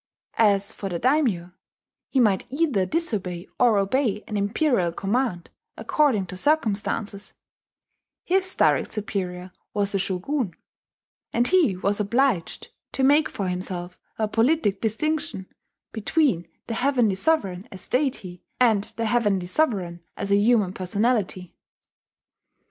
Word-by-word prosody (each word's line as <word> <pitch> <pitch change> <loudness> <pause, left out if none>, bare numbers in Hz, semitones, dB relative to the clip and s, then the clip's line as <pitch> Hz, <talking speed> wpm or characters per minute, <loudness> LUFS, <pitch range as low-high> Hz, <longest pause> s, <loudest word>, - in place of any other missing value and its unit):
As 200 -1 +3
for 195 - -5
the 175 - -2
daimyo, 230 - +1 0.6
he 270 - +1
might 210 -5 +2
either 275 - +1
disobey 195 - -2
or 240 -4 +4
obey 210 +1 0
an 210 - -5
imperial 205 - +1
command 195 -1 -2 0.3
according 265 -11 +1
to 180 - -8
circumstances: 215 -5 -1 0.9
his 375 +1 0
direct - - +2
superior 185 -4 -3 0.2
was 205 -1 +1
the 195 - +1
shogun; 190 - -2 0.8
and 240 +1 +1
he 330 - +3
was 200 +3 0
obliged 220 -3 0 0.2
to 265 - -1
make 290 +3 +4
for 195 - -4
himself 180 -1 -4 0.2
a 220 - 0
politic 225 -3 +1
distinction 295 - -1 0.5
between 220 - +1 0.2
the 230 - -4
Heavenly 245 -4 +2
Sovereign 195 - 0
as 190 - -7
deity, 240 - -2 0.2
and 220 -5 +3
the 230 - -1
Heavenly 210 -5 +1
Sovereign 185 - 0 0.2
as 200 0 -3
a - - +6
human 205 -2 +3
personality. 190 -1 -1
210 Hz, 125 wpm, -24 LUFS, 190-255 Hz, 0.9 s, a